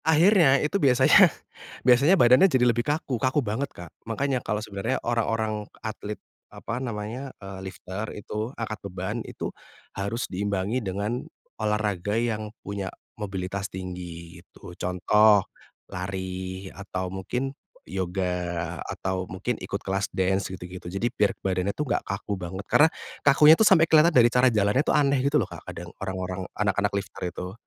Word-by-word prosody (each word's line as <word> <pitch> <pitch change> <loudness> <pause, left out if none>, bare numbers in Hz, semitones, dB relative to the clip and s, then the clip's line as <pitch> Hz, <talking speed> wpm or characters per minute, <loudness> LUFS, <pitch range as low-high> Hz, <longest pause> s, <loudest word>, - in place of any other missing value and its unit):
Akhirnya 160 -3 +5
itu 150 +9 0
biasanya 130 -1 +6 0.6
biasanya 140 +9 +6
badannya 125 +7 +6
jadi 130 -6 +3
lebih 120 -1 +3
kaku 140 -2 -2
kaku 130 +1 +1
banget 115 +7 -2
Kak 85 -2 -12 0.2
makanya 130 +2 0
kalau 105 - -2
sebenarnya 100 +5 -2
orang-orang 110 -2 -1 0.2
atlet, 105 -1 -5 0.3
apa 115 +2 -5
namanya, 120 +2 -4
eee, 95 -1 -7
lifter 95 +3 -6
itu 105 +2 -4
angkat 110 -2 -4
beban 95 +4 -4
itu, - - -6 0.4
harus 100 +5 -2
diimbangi 100 +4 -1
dengan, 105 +4 -2 0.4
olahraga 105 -2 0
yang 110 -2 -1 0.2
punya 100 -2 -4 0.3
mobilitas 95 0 -3
tinggi 90 -2 -7
itu 90 - -13
contoh, 100 +3 +4 0.4
lari 95 0 -5
atau 95 -2 -5
mungkin 125 +8 -3 0.3
yoga 90 -2 -2
atau 95 -1 -3
mungkin 110 +5 -3
ikut 100 - -4
kelas 95 +1 -1
dansa 95 +1 0
gitu-gitu 90 0 -8
jadi 95 +6 -1
biar 105 -3 +1
badannya 95 +1 0
tuh 150 - -1
gak - - +1
kaku 100 +1 -3
banget 95 +3 -6
karena, 155 +2 +5 0.3
kakunya 150 +2 +7
itu 165 - +2
sampai 165 -4 +7
kelihatan 160 0 +6
dari 120 -4 +6
cara 125 +1 +5
jalannya 105 +2 +2
tuh - - +1
aneh 140 -2 +3
gitu 140 +3 +2
loh - - +2
Kak - - -9
kadang - - -8
orang-orang 95 0 -3 0.2
anak-anak 100 0 +1
lifter 100 -1 -6
itu. 90 +1 -7
105 Hz, 150 wpm, -26 LUFS, 95-125 Hz, 0.6 s, kakunya